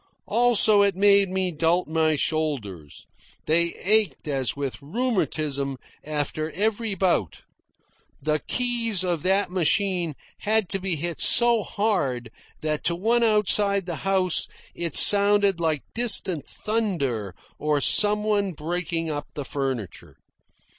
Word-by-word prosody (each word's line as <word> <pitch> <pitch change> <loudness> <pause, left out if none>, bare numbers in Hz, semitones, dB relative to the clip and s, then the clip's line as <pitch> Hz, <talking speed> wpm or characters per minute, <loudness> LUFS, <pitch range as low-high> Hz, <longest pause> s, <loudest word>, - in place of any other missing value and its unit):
Also, 220 -2 +3
it 200 -2 +2
made 200 0 +4
me 185 -1 -2
doubt 165 +3 0
my 160 0 +1
shoulders. 130 - -4 0.4
They 170 +2 +1
ached 210 -3 +1
as 135 -4 -2
with 140 -1 -5
rheumatism 155 - -2 0.3
after 155 +1 -3
every 215 +2 -1
bout. 175 - -1 0.8
The 155 0 -1
keys 235 -6 0
of 175 -4 -2
that 190 +2 0
machine 180 -2 0 0.2
had 215 -3 0
to 195 - -1
be 185 -2 -2
hit 170 +2 -4
so 235 -1 +5
hard 145 - -2 0.3
that 155 -1 -3
to 170 - +1
one 230 +7 +1
outside 205 -2 +2
the 170 -3 -5
house 190 +1 0 0.3
it 170 -3 -2
sounded 200 -2 +6
like 160 -4 -1
distant 190 - +1
thunder 140 - -3 0.2
or 150 -1 0
some 210 +8 +4
one 205 -3 -1
breaking 165 +1 -4
up 145 -1 -5
the 145 - -5
furniture. 130 - -5
180 Hz, 125 wpm, -24 LUFS, 150-205 Hz, 0.8 s, sounded